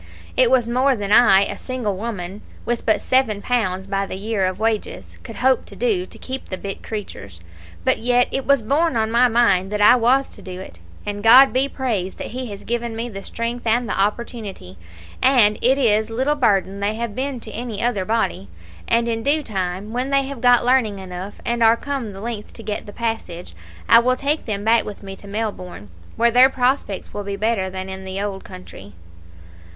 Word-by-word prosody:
It - - +4
was 255 -3 +3
more 255 +3 +2
than 205 -2 -4
I, 205 -4 +6
a - - -6
single 245 -6 -3
woman, 200 -2 -5 0.2
with 240 +1 -2
but 220 - +3
seven 255 -6 +1
pounds 195 -5 -1
by 195 0 -2
the - - -6
year 200 -1 -1
of 185 0 -3
wages, 220 0 -3
could 230 -3 -10
hope 260 +5 +2
to - - -13
do, 410 -7 0
to - - -12
keep 265 +1 -7
the 185 - -4
bit 195 0 -6
creatures; 100 - -7 0.5
but - - +2
yet 245 +1 +3
it 270 - -2
was 280 -4 +4
borne 290 +5 +1
on 220 0 0
my 240 +2 +5
mind 200 -5 +2
that 210 - -2
I 210 +4 +7
was 255 +3 +2
to - - -12
do 185 -1 -8
it, 85 - -11 0.3
and 205 0 -4
God 250 +5 +7
be 265 +2 +1
praised 215 -10 -3
that - - -6
He 255 +1 -5
has 200 -2 -8
given 235 -1 -3
me 230 +2 -4
the 195 -3 -7
strength 230 +3 -4
and 235 +2 +2
the - - -2
opportunity, 205 - -3 0.5
and 240 -6 +4
it 260 +3 +4
is 220 -5 +2
little 260 +6 0
burden 200 -8 +1
they 205 +2 -1
have 230 -1 -4
been 265 +1 -3
to 220 - -9
any 230 -2 -5
other 235 -6 0
body; 220 - -1 0.4
and 235 0 +2
in 225 -1 -1
due 295 +4 +1
time, 195 -1 -4
when 250 +2 -2
they 275 0 +2
have 270 -3 -7
got 245 -1 +5
learning 245 -5 +2
enough, 190 +1 -7
and 235 0 -1
are 225 0 +5
come 270 -6 -4
the 195 0 -10
length 225 -2 -6
to 225 - -11
get 210 -1 -4
the - - -8
passage, 225 - -4 0.3
I 230 - +8
will 255 +2 +2
take 285 +4 -1
them 205 -3 -3
back 225 +1 +3
with 205 -1 -9
me 195 -1 -7
to 200 - -13
Melbourne, 200 - -5 0.3
where 235 +1 +3
their 250 +3 +7
prospects 250 -6 -1
will 205 - -4
be 200 0 -4
better 205 -2 0
than 190 0 -6
in 190 0 -7
the 190 +1 -5
old 200 -1 -4
country." 180 - -12
225 Hz, 210 wpm, -21 LUFS, 200-245 Hz, 0.5 s, I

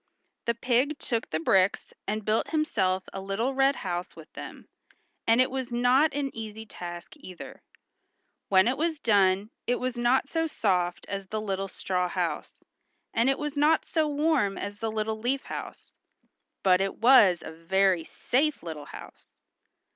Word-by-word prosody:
The 235 - +1
pig 255 +5 +1
took 235 -6 -3
the 155 - -1
bricks 185 +4 +2
and 215 0 -2
built 215 +1 +1
himself 190 - 0
a 195 - -5
little 205 +7 -1
red 270 +1 +3
house 175 -1 -4
with 160 -2 -14
them, - - -9 0.6
and 230 +2 +5
it 255 - +3
was 260 -2 -4
not 250 +6 +4
an 280 -2 -2
easy 220 0 -7
task 175 -4 -8
either. 185 -10 -10 0.9
When 190 +2 +5
it 260 +3 0
was 325 0 0
done 200 -4 +2 0.2
it 245 - +2
was 250 0 -3
not 245 +3 +2
so 325 +2 0
soft 180 - 0
as 195 -1 -5
the 215 +3 -3
little 195 -2 -2
straw 180 -1 -2
house, - - -3 0.5
and 235 +3 +3
it 270 - +2
was 295 -1 -4
not 300 +2 +3
so 315 -2 +1
warm 290 -8 +1
as 205 0 -5
the 225 -1 -2
little 220 0 -2
leaf 260 +4 -1
house, - - -8 0.7
but 185 -1 +4
it 195 0 -1
was 225 -8 +6
a - - -7
very 180 +2 +1
safe 280 - -1
little 155 -3 -6
house. - - -12
220 Hz, 165 wpm, -27 LUFS, 190-265 Hz, 0.9 s, was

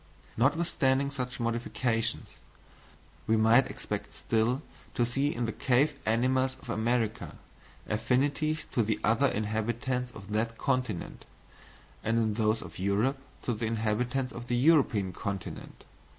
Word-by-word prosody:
Notwithstanding 140 0 +2
such 125 -3 -4
modifications, 115 -1 -1 0.9
we 110 - +4
might 115 +4 +5
expect - - -5
still 120 +5 +1 0.3
to 120 -3 +3
see 135 +4 0
in 120 0 -1
the 110 - -1
cave 130 +5 +2
animals 130 +3 +2
of 130 -3 -7
America, 115 -1 -1 0.5
affinities 145 +7 +1
to 120 - +2
the 110 0 0
other 115 +6 +4
inhabitants 120 +3 -1
of 105 -4 -11
that 115 +2 -1
continent, 130 - -2 0.8
and 115 +1 +1
in 110 -2 +2
those 110 0 +1
of - - -10
Europe 105 +8 +1 0.2
to 120 - 0
the 110 +1 -2
inhabitants 115 +4 0
of 120 0 -8
the 120 - 0
European 125 - +3
continent. 100 -3 -6
120 Hz, 130 wpm, -30 LUFS, 110-130 Hz, 0.9 s, might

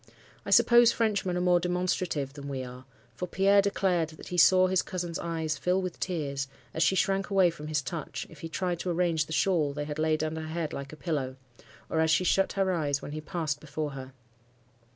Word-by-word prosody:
I - - -3
suppose 240 -1 +6
Frenchmen 200 -5 0
are - - 0
more 180 -1 +4
demonstrative 180 -5 -1
than 140 -1 -8
we 135 -2 -3
are; 125 +1 -10 0.3
for 180 +10 -5
Pierre 195 +3 +4
declared 185 -4 +1
that - - -11
he 180 - -4
saw 185 +2 +7
his 185 0 +2
cousin's 175 -2 -4
eyes 160 -3 -2
fill 180 +1 +1
with 185 -2 -4
tears, 140 -6 -2 0.3
as 160 - -2
she 190 - +4
shrank 195 +1 +1
away 190 -3 +4
from 150 -2 -9
his 150 -3 -1
touch, 155 +2 -5
if - - -15
he 165 - -6
tried 175 0 -2
to 180 - -3
arrange 170 -3 +1
the - - -11
shawl 155 -2 +1
they 145 +1 -4
had 150 0 -5
laid 155 0 +1
under 160 0 -3
her 155 - -6
head 160 -1 -3
like 140 0 -6
a - - -9
pillow, 140 -6 -2 0.5
or 160 - -1
as 160 0 +3
she 160 +3 +3
shut 195 +2 +2
her 195 -1 +1
eyes 145 -5 -1
when - - -6
he 155 +1 -5
passed 155 -3 -3
before 150 0 -4
her. 135 -1 -8
165 Hz, 220 wpm, -28 LUFS, 150-185 Hz, 0.5 s, saw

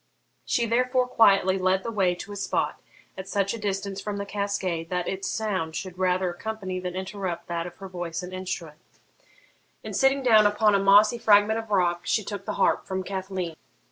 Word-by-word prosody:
She 235 - +1
therefore 250 +2 +1
quietly 195 -5 +4
led 185 +1 +1
the 230 - -3
way 190 -5 +1
to 195 - -9
a - - -6
spot 195 - -2 0.3
at 190 0 -7
such 200 0 0
a 230 - -5
distance 195 -1 -3
from 205 0 -4
the 200 - -3
cascade 195 -5 -2
that 180 -1 -2
its 190 0 -3
sound 185 -8 -2
should 185 -2 -6
rather 185 0 +1
accompany 190 0 -5
than 180 0 -5
interrupt 185 -2 -4
that 170 0 -2
of 175 - -11
her 195 - -9
voice 175 -1 -5
and 180 +1 -8
instrument, 170 -4 -5 1.0
and, - - -6
sitting 270 0 +3
down 220 -4 +6
upon 210 0 +3
a 200 - +4
mossy 205 +4 +5
fragment 215 +1 +4
of 225 -1 -8
rock, 175 -4 +2
she 215 - +1
took 200 -1 -6
the - - -3
harp - - +1
from 190 0 -2
Cathleen. 190 -3 -4
195 Hz, 195 wpm, -26 LUFS, 185-210 Hz, 1.0 s, down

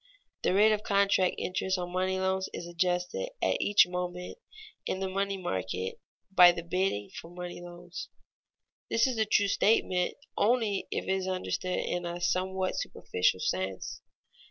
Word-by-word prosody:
_The 185 - +2
rate 215 +2 +6
of 210 -1 +1
contract 200 -3 +2
interest 185 +1 -1
on 175 -1 -4
money 185 +1 0
loans 190 0 0
is - - -5
adjusted 180 - -1
at - - +1
each 205 - +6
moment 180 - -4 0.5
in 190 - -1
the 190 - -1
money 195 +1 -1
market 95 - -3 0.3
by 180 -2 +9
the 170 -1 -5
bidding 170 - -1
for 165 - -9
money 175 0 -7
loans._ 175 0 -8 0.8
This 230 - +3
is 255 -4 -1
a 220 - +3
true 205 -1 +3
statement 185 -3 +2 0.2
only 220 -3 +1
if - - -2
it - - -2
is 190 -1 0
understood 185 0 -2
in 175 0 -2
a 170 0 -4
somewhat 185 +1 0
superficial 90 0 0
sense. 95 0 -2
185 Hz, 155 wpm, -30 LUFS, 175-195 Hz, 0.8 s, by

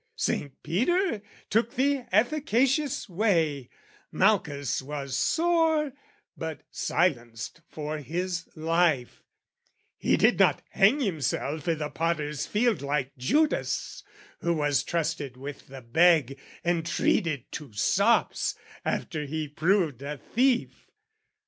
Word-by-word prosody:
Saint 140 -2 -2
Peter 295 - +1 0.3
took 230 +2 +1
the 275 -1 +1
efficacious 270 +5 +2
way; 165 - +1 0.4
Malchus 175 - +1
was 140 -1 -5
sore 320 - +2 0.4
but 160 -3 -5
silenced 120 -5 -1
for 155 0 -4
his 175 +4 -3
life: 160 -5 +1 0.8
He - - +2
did - - +4
not - - +4
hang 220 +10 +4
himself 160 - -2
i' 165 - +2
the 150 -1 -4
Potter's 150 -3 -1
Field 230 +1 +1
Like 140 -1 -2
Judas, 295 - 0 0.4
who 170 0 0
was 145 -2 +1
trusted 155 -6 -2
with 140 +2 -8
the 135 -1 -10
bag 140 0 +3 0.2
And 170 -1 +1
treated 160 -4 0
to 145 -6 -7
sops 200 - +2 0.3
after 150 -3 -2
he 155 +1 -3
proved 155 - +1
a 145 +1 -5
thief. 250 - 0
165 Hz, 110 wpm, -27 LUFS, 145-215 Hz, 0.8 s, did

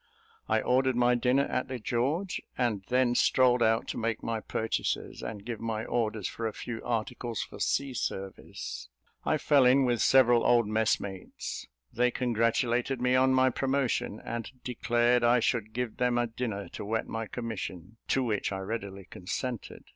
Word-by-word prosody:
I - - +3
ordered 130 0 +2
my 120 0 +4
dinner 125 +3 +3
at 125 - -2
the 130 -1 -4
George, 135 - -1 0.2
and 120 -6 0
then 125 -1 +3
strolled 125 0 +4
out 115 0 +2
to - - -3
make 115 -1 -2
my 115 -1 -1
purchases, 110 +1 -2
and 105 -2 -6
give 115 -3 -4
my 110 -1 -3
orders 110 -4 -1
for 115 - -3
a 110 - -4
few 115 -2 -6
articles 120 0 -2
for - - -11
sea 140 -1 0
service. 95 - -5 0.4
I - - +2
fell 140 -2 +4
in 130 +2 +5
with 120 -2 +1
several 120 -3 +5
old 120 -3 +4
messmates; 105 -3 -2 0.3
they 125 +1 +3
congratulated 120 +1 +1
me 125 +1 +2
on 130 0 +4
my 130 0 +4
promotion, 130 -5 0
and 115 -2 -4
declared 120 0 +2
I 120 +1 +5
should 115 -2 0
give 120 -1 -3
them 125 -1 +2
a 120 - +2
dinner 115 -3 -4
to - - -7
wet 110 +2 -1
my 115 -1 -4
commission, 110 -4 -6
to 135 - +2
which 105 -5 -1
I 95 - -2
readily 100 -1 -5
consented. 120 +6 -5
120 Hz, 170 wpm, -29 LUFS, 110-125 Hz, 0.4 s, in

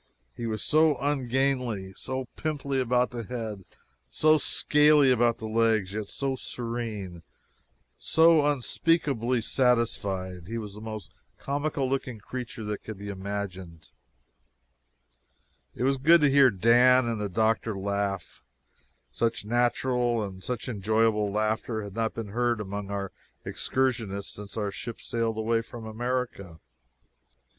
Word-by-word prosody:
He 115 - -4
was 110 -1 -2
so 155 -2 +4
ungainly, 130 -7 -1
so 130 0 -4
pimply 140 -3 -2
about 125 0 +2
the 120 -1 -4
head, 110 -4 -6 0.4
so 155 - +4
scaly 150 -2 +4
about 120 -1 +3
the 110 - -7
legs, 110 -3 +1
yet 105 -1 -3
so 135 +3 -2
serene, 115 -8 -5 0.8
so 160 -1 +5
unspeakably 140 -3 +1
satisfied! 100 -8 0
He 115 +2 -4
was 105 -3 -6
the 105 - -10
most 110 -3 -7 0.3
comical 140 -1 -2
looking 130 -3 -2
creature 120 +2 -7
that 105 -1 -4
can 110 -2 -7
be 100 +1 -7
imagined. 95 -4 -6 1.8
It - - -3
was 135 +1 +2
good 165 +5 +6
to 145 -2 +4
hear 140 -1 +7
Dan 120 +5 +5
and 115 -2 -2
the 105 - -2
doctor 110 +2 0
laugh 100 0 -3 0.7
such 115 - -1
natural 120 0 +1
and 95 -2 -7
such 125 -1 -4
enjoyable 110 -1 +1
laughter 110 +1 -1
had 100 -2 -8
not 115 +1 -1
been 115 -3 -5
heard 120 +1 0
among 100 0 -5
our 100 -1 -3 0.3
excursionists 115 -7 -1
since 105 0 -9
our 105 -2 -1
ship 115 +3 -6
sailed 115 -2 -2
away 115 +1 +1
from 115 0 -10
America. 115 -6 -3
115 Hz, 135 wpm, -27 LUFS, 105-130 Hz, 1.8 s, hear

